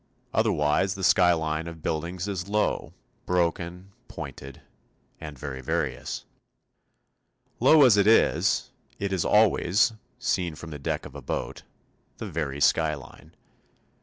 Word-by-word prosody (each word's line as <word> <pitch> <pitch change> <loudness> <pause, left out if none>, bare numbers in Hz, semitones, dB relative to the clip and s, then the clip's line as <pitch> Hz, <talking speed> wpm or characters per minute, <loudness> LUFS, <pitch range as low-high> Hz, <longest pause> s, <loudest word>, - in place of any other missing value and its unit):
Otherwise 75 +6 +1
the 95 - -7
skyline 80 -3 +3
of 80 -2 -9
buildings 85 +4 -3
is 95 -1 -4
low, 105 +1 0 0.4
broken, 90 +1 -1 0.2
pointed, 70 0 -9 0.6
and 75 -3 -8
very 65 -1 -6
various. 65 - -3 1.3
Low 155 -2 +6
as 120 -6 +6
it 100 0 +4
is, 115 - +3 0.3
it 100 -1 -2
is 90 - 0
always 105 0 +3 0.2
seen 90 -9 -1
from 80 +1 -9
the 75 - -7
deck 70 - -3
of - - -10
a - - -8
boat - - -4 0.6
the - - -6
very 75 -3 -3
skyline. 75 -2 0
85 Hz, 125 wpm, -26 LUFS, 75-100 Hz, 1.3 s, Low